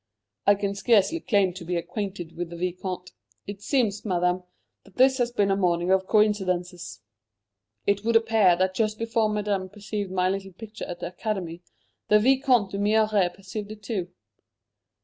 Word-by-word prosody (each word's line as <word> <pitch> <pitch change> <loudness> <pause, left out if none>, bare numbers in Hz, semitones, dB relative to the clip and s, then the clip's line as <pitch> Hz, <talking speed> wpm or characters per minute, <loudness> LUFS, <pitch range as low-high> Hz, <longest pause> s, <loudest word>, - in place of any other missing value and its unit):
"I 205 - +7
can 200 0 -2
scarcely 215 - +3
claim 200 - +2
to 180 -1 -9
be 175 +1 -3
acquainted 180 -1 -4
with 175 0 -4
the 170 - -8
Vicomte. 180 +1 -4 0.3
It 200 0 -8
seems, 220 -4 0
Madame, 180 -2 0 0.4
that 195 - -20
this 260 +1 +4
has 240 -1 +1
been 205 -4 +1
a - - +3
morning 175 -2 +1
of 190 0 +2
coincidences. 185 -5 0 0.8
It 200 0 +1
would 230 +1 +1
appear 225 -5 +4
that 185 +1 +1
just 215 +1 0
before 225 -1 0
Madame 205 -3 -1
perceived 205 -1 -5
my 185 0 +1
little 195 0 -3
picture 215 +3 -8
at 175 - -7
the - - -3
Academy, 180 -3 -4 0.5
the 210 - +6
Vicomte 255 -3 +3
d'Humières 205 -2 +2
perceived 200 +2 -7
it 215 -1 -11
too." 195 -5 -3
200 Hz, 165 wpm, -26 LUFS, 185-215 Hz, 0.8 s, I